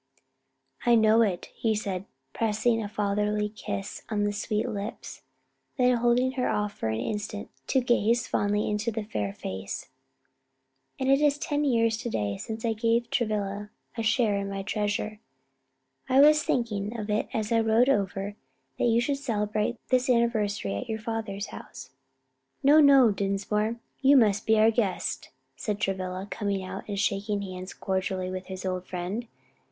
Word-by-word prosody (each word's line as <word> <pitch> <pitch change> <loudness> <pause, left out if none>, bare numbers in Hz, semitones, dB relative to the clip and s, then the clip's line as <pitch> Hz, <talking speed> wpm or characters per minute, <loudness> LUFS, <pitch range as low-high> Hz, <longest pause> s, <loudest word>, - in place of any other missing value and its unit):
"I 240 -1 +5
know 220 0 +5
it," 195 -6 0
he 220 -2 0
said, 195 -3 -3 0.3
pressing 225 +1 +1
a 205 - -4
fatherly 210 0 0
kiss 100 - -5
on 210 -2 0
the 205 0 0
sweet 210 +2 -1
lips, 210 -2 -6 0.6
then 250 -1 +4
holding 240 +2 +3
her 260 -1 -1
off 210 0 -1
for 110 - -4
an 110 0 -1
instant 210 - -4 0.2
to 265 - +3
gaze 240 -1 +2
fondly 205 +1 +1
into 210 +2 -1
the 220 0 -3
fair 105 - -3
face. 95 0 -6 1.1
"And 265 - -1
it 275 +1 +4
is 295 -1 +3
ten 290 0 -1
years 230 -5 +2
to 240 +1 -4
day 100 - -2
since 220 - -5
I 225 - +2
gave 230 +1 +1
Travilla 210 -3 -1 0.3
a 230 - -2
share 225 -2 +2
in 200 0 -3
my 195 0 -4
treasure. 210 +1 -2 0.9
I 260 +1 +5
was 300 +1 +7
thinking 225 -4 -1
of 210 - -4
it 210 - 0
as 215 0 -2
I 230 - +4
rode 225 +2 +4
over 195 -6 +1
and 205 0 -6 0.4
that - - +2
you 230 -1 +4
should 275 +3 0
celebrate 215 -2 -1
this 255 0 +2
anniversary 220 - +1
at - - -6
your 220 - -1
father's 220 -3 -4
house." - - -10 0.7
"No, 290 +3 +7
no, 275 -6 +7
Dinsmore, 205 +3 -1 0.3
you 280 +1 +6
must 215 -3 +3
be 220 0 +5
our 220 +1 +6
guest," 215 -5 -1 0.3
said 205 +9 -3
Travilla, 185 -1 -2
coming 200 -2 -2
out 185 - -7
and 200 -1 -2
shaking 200 0 0
hands 185 0 -7
cordially 190 -1 -2
with 185 0 -5
his 190 0 -6
old 185 -1 -3
friend. 190 +6 -4
210 Hz, 170 wpm, -27 LUFS, 200-235 Hz, 1.1 s, was